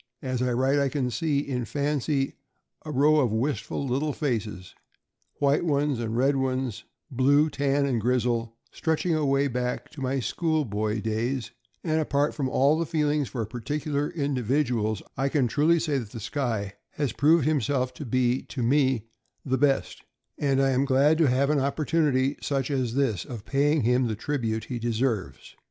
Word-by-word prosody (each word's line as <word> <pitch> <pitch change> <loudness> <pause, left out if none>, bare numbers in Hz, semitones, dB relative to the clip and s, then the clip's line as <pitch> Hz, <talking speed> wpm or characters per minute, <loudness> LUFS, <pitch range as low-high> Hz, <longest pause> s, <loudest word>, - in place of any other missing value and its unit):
As 130 -2 -2
I 125 0 +1
write, 130 +4 +2
I 140 -1 +2
can 130 -2 -1
see, 150 -1 0
in 125 -3 -2
fancy, 145 +1 -1 0.5
a 155 - -8
row 150 +2 +4
of 125 -6 +2
little 110 - 0
wistful 135 +3 -1
faces 110 - -3 0.3
— - - -47
white 140 +2 +2
ones 145 -5 +1
and 115 -1 -2
red 135 +2 +3
ones, 130 -3 -2 0.3
blue, 145 +4 +3
tan, 140 0 +1
and 125 -5 0
grizzle, 120 -1 0
stretching 160 +2 0
away 140 -2 +2
back 125 -1 -3
to 150 - -10
my 135 +1 0
school 155 +4 0
boy 105 0 -2
days; 115 +3 -2 0.3
and 160 -2 +1
apart 145 0 +1
from 135 -4 -2
all 145 +6 +3
feelings 150 -3 0
for 115 -3 -3
particular 145 +6 -3
individuals, 125 - -1
I 135 +2 +1
can 135 -4 +2
truly 155 +8 +3
say 150 -4 0
that 115 -5 -7
the 115 - -8
Skye 110 -3 -2 0.2
has 145 -5 -1
proved 155 0 +4
himself 135 -3 0
to 150 - -8
be, 125 0 +1
to 125 - -5
me, 130 -2 +2 0.4
the 130 -1 0
best, 140 -2 +1 0.4
and 135 -2 +1
I 135 0 +3
am 130 +1 +2
glad 140 +3 +3
to 160 - +5
have 135 +3 +2
an 150 - +2
opportunity, 140 -1 +1
such 135 -1 -1
as 130 -4 -1
this, 120 - +1
of 115 -4 -8
paying 145 +1 +2
him 125 +2 +2
the 110 - -2
tribute 115 -2 -2
he 125 -2 -5
deserves. 115 -3 -2
135 Hz, 175 wpm, -26 LUFS, 120-145 Hz, 0.5 s, to